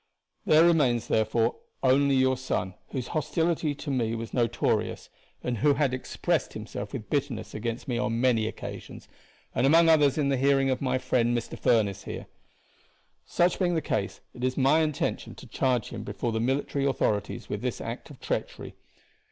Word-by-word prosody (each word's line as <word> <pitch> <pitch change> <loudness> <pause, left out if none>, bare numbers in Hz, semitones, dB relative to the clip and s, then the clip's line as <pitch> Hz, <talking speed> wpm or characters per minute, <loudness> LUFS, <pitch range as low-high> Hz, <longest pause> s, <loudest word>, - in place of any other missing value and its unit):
There 155 +2 +6
remains, 135 -9 +3
therefore, 110 +2 +1 0.3
only 135 +1 +4
your 130 0 +3
son, 125 -7 -2 0.2
whose 125 -3 -4
hostility 160 -1 0
to 145 0 -5
me 115 -4 0
was 115 0 -6
notorious, 120 -3 0 0.3
and 120 -3 -2
who 145 +4 +4
had 140 -3 +1
expressed 130 - -1
himself - - -6
with 110 - -7
bitterness 140 -5 -2
against 115 +2 -4
me 120 -2 -1
on 115 -2 -1
many 120 -3 +2
occasions, - - -8 0.5
and 125 +3 +2
among 165 +3 +6
others 150 -3 +4
in 145 -2 +1
the 135 - +2
hearing 135 0 +3
of 130 - -1
my 130 -1 +1
friend 120 -2 +1
Mr. 115 - -5
Furniss 105 -5 +1
here. - - -6 1.0
Such 175 +1 +2
being 175 -2 +1
the - - +2
case, - - -2
it 125 - -9
is 130 0 0
my 140 +3 +4
intention 155 -3 -1
to - - -12
charge 125 -4 0
him 115 - -6
before 105 +3 -3
the 110 - -1
military 135 +3 0
authorities 110 -7 -1
with - - -4
this - - -2
act - - -6
of - - -13
treachery. - - -4
130 Hz, 175 wpm, -27 LUFS, 115-145 Hz, 1.0 s, There